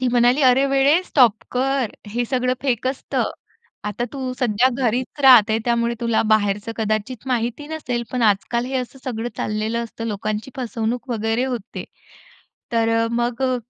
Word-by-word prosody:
ती 255 - +1
म्हणाली, 245 +3 +3
"अरे 260 +2 +5
वेडे 275 +5 +3
स्टॉप 245 - +4 0.2
कर. 260 -2 0 0.2
हे 240 +4 -1
सगळं 255 0 0
फेक 255 -2 0
असतं. 265 +1 -1 0.5
आता 210 +3 -2
तू 260 -2 -4
सध्या 250 0 +3 0.2
घरीच 245 +5 -1
राहते 230 -5 +7
त्यामुळे 235 0 +1
तुला 230 -1 +1
बाहेरचं 210 +1 +1
कदाचित 215 +3 -2
माहिती 245 +3 -2
नसेल. 250 -7 -3
पण 250 - 0
आजकाल 225 +3 +1
हे 265 - -2
असं 255 +1 -4
सगळं 240 -2 -3
चाललेलं 215 +2 -2
असतं. 230 0 -7
लोकांची 215 +2 -3
फसवणूक 240 0 -3
वगैरे 225 +2 0
होते." 245 -6 -5 0.9
तर 230 0 +2
मग 240 +2 -1
अ 255 -1 +2
240 Hz, 155 wpm, -21 LUFS, 225-255 Hz, 0.9 s, राहते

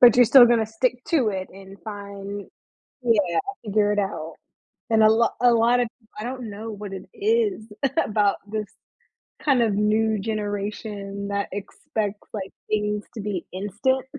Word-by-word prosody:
But, 245 -1 +8
you're 245 - +8
still 250 +2 +9
gonna 230 -2 +3
stick 245 +3 -1
to 270 -10 +3
it 190 -2 -3
and 195 +1 -13
find, 200 -1 -7 0.5
yeah, 200 -8 +2 0.3
figure 205 0 +2
it 205 - -1
out. 180 -5 -2 0.6
And 220 -1 +5
a 215 - +7
lot 230 +1 +3
a 245 -1 +6
lot 235 +2 +4
of, 240 - +1 0.3
I 215 - -4
don't 250 -2 -5
know 215 +2 -6
what 205 -1 -7
it 190 - -7
is 420 - +1 0.3
about 205 -1 +2
this 215 -1 -2 0.8
kind 275 -5 +3
of 215 -3 +1
new 215 +1 +2
generation 205 -1 -4
that 200 0 -1
expects, 205 +1 -4
like, 195 -3 -5 0.2
things 210 -1 0
to 220 - -4
be 200 -4 -3
instant. 210 +8 0
210 Hz, 160 wpm, -24 LUFS, 200-230 Hz, 0.8 s, still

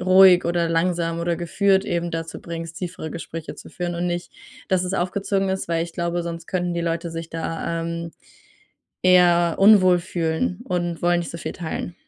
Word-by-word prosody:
ruhig 185 0 +7
oder 170 0 +1
langsam 165 0 0
oder 170 0 0
geführt 190 +3 +2
eben 170 0 -2
dazu 165 0 -5
bringst, 165 -1 -7
tiefere 175 -3 -5
Gespräche 165 -1 -7
zu - - -12
führen 175 -1 -4
und 175 +1 -2
nicht, 175 0 -4 0.4
dass 185 -1 +2
es 185 +1 -2
aufgezwungen 195 +1 0
ist, 190 -2 -3
weil 165 -1 0
ich 170 - -10
glaube, 170 0 -2
sonst 170 -1 -6
könnten 180 -1 -1
die 170 - -1
Leute 170 0 -2
sich 165 0 -6
da, 165 0 -3
ähm, 170 0 -4 0.9
eher 175 -2 +5
unwohl 190 -3 +6
fühlen 160 - -2
und 175 -2 -2
wollen 175 0 +3
nicht 170 - -5
so 170 - -7
viel - - -5
teilen. 170 0 -5
170 Hz, 185 wpm, -23 LUFS, 165-180 Hz, 0.9 s, ruhig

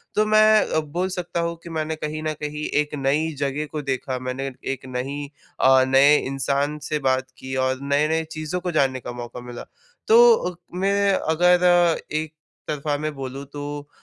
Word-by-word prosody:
तो 215 - +3
मैं 215 0 +5
अब 160 - +2
बोल 180 +4 -1
सकता 180 -2 -4
हूँ 170 0 -2
कि 170 - -9
मैंने 160 -1 -2
कहीं 155 0 -5
न 155 0 -1
कहीं 150 0 -4 0.2
एक 150 0 -6
नई 145 +3 0
जगह 145 +1 -1
को 155 -1 -3
देखा, 130 -1 -3
मैंने 130 +2 -4 0.2
एक 135 - -10
नई 140 +3 -4 0.3
अ, 130 0 +6
नए 140 +3 +6
इंसान 140 +2 -1
से 150 - 0
बात 130 0 0
की 130 0 -6
और 130 0 -2
नए-नए 150 +3 +1
चीज़ों 155 +3 -3
को 180 - -2
जानने 135 -4 +1
का 120 - -7
मौका 120 0 -8
मिला। 120 -1 -8 0.4
तो 455 - +5 0.2
मैं 200 +1 +2
अगर 175 0 +3
एक 155 0 -2 0.3
तरफा 150 -1 -2
में 155 +1 -3
बोलूँ 135 0 -6
तो 145 0 -6
150 Hz, 175 wpm, -23 LUFS, 135-170 Hz, 0.4 s, अ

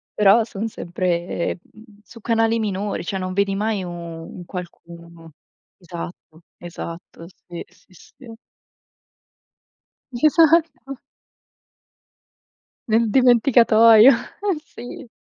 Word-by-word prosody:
Però 210 +2 +5
son 215 0 -5
sempre, 175 -3 -3
mhmm, 215 -1 -20
su 230 - -15
canali 225 0 +1
minori. 205 -1 -3
Cioè, 190 +3 -4
non 185 0 -4
vedi 200 0 0
mai 210 -1 -2
u 180 - -6
un 170 +1 -9
qualcuno 170 -2 -11 0.5
Esatto, 170 -2 -10 0.2
esatto. 170 -1 -9 0.2
Sì, 175 -1 -7
sì, - - -26
sì. 230 +8 -17 1.8
Esatto. 310 0 +2 1.9
Nel 225 +1 +2
dimenticatoio, 230 -2 +6
eh 365 - -1
sì. 245 +2 -11
205 Hz, 95 wpm, -21 LUFS, 175-230 Hz, 1.9 s, dimenticatoio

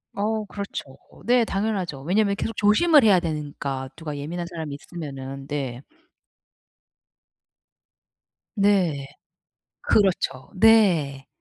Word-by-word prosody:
어 215 +1 -1
그렇죠. 200 0 -6 0.4
네 245 0 +4
당연하죠. 195 -9 -2
왜냐하면 200 +4 +2
계속 225 +3 -4
조심을 265 +8 +5
해야 200 -4 +6
되는 155 -4 -4
까 135 -1 -3
누가 155 -3 -6
예민한 170 +5 -4
사람이 160 -4 -6
있으면은. 135 -4 -8
네. 135 -3 -4 2.7
네. 185 -9 +2 0.8
그렇죠. 175 -10 +1
네. 185 -10 +4
175 Hz, 215 characters per minute, -24 LUFS, 140-205 Hz, 2.7 s, 해야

